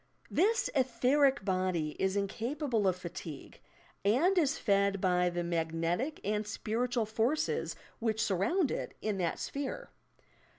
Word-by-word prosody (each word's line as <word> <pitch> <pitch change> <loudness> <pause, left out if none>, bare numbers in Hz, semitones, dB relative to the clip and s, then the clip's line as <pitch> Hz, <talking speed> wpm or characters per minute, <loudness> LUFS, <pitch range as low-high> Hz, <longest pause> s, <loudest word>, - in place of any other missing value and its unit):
This 455 +6 +3
etheric 260 -1 +3
body 185 -5 0
is 190 0 +1
incapable 230 +3 -1
of 185 - +3
fatigue, 170 -5 -8 0.4
and 270 - +3
is 315 -4 +2
fed 200 -1 +2
by 180 -1 +2
the 175 0 -2
magnetic 170 - -1
and 210 +1 -1
spiritual 235 +2 -1
forces 235 +8 0 0.2
which 220 -1 0
surround 235 - +1
it - - -4
in 210 -3 -1
that 170 -2 0
sphere. - - -4
215 Hz, 125 wpm, -32 LUFS, 185-270 Hz, 0.4 s, This